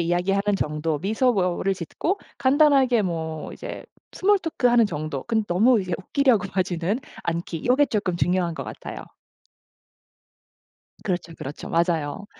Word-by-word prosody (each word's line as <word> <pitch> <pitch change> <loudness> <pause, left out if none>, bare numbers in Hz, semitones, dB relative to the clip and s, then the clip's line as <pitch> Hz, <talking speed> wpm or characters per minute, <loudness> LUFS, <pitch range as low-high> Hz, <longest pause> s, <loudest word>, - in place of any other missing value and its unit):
이야기하는 195 +4 +1
정도 150 -1 -1
미소를 195 - +1
짓고 315 - -2 0.2
간단하게 270 -4 +4
뭐 160 -3 -4
이제 - - -7 0.3
스몰 410 +2 +3
토크 325 -8 -1
하는 235 -2 +5
정도. 155 -5 -4
근데 220 -2 0
너무 220 +6 +4
이제 185 -2 -5
웃기려고 230 0 +2
하지는 185 +2 0 0.3
않기. 170 -1 -3
요게 280 +3 +5
조금 200 -5 -1
중요한 175 -1 +1
것 - - -5
같아요. - - -7 2.0
그렇죠, 175 -3 -3
그렇죠. 140 +3 -7
맞아요. 170 +2 0
185 Hz, 300 characters per minute, -24 LUFS, 170-235 Hz, 2.0 s, 하는